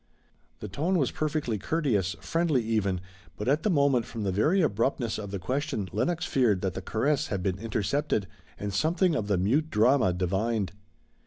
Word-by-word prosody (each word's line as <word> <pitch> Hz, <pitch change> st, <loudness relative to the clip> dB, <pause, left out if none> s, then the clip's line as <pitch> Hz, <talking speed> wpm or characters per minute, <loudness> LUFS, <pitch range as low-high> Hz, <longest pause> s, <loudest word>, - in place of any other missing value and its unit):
The 105 Hz, -, -4 dB
tone 160 Hz, -, 0 dB
was 135 Hz, -7 st, +1 dB
perfectly 150 Hz, -8 st, -1 dB
courteous, 105 Hz, -, 0 dB
friendly, 165 Hz, -7 st, +1 dB
even, 100 Hz, -5 st, 0 dB, 0.4 s
but 105 Hz, -, -4 dB
at 145 Hz, +4 st, +3 dB
the 210 Hz, -, +1 dB
moment 140 Hz, -, +3 dB
from 115 Hz, -2 st, -5 dB
the 95 Hz, -, 0 dB
very 150 Hz, -, +2 dB
abruptness 115 Hz, -2 st, 0 dB
of 100 Hz, -2 st, -6 dB
the 100 Hz, -, -3 dB
question 110 Hz, -2 st, -2 dB
Lenox 170 Hz, -, 0 dB
feared 110 Hz, -8 st, +2 dB
that 95 Hz, -3 st, -1 dB
the -, -, -5 dB
caress 145 Hz, +6 st, 0 dB
had 95 Hz, -3 st, -3 dB
been 95 Hz, -1 st, -1 dB
intercepted 115 Hz, +2 st, -1 dB, 0.3 s
and 100 Hz, -1 st, -4 dB
something 170 Hz, -, +2 dB
of 110 Hz, -9 st, -1 dB
the 100 Hz, -2 st, +2 dB
mute 130 Hz, -, +1 dB
drama 115 Hz, -2 st, +4 dB
divined. 95 Hz, +3 st, -1 dB
115 Hz, 175 wpm, -28 LUFS, 100-150 Hz, 0.4 s, drama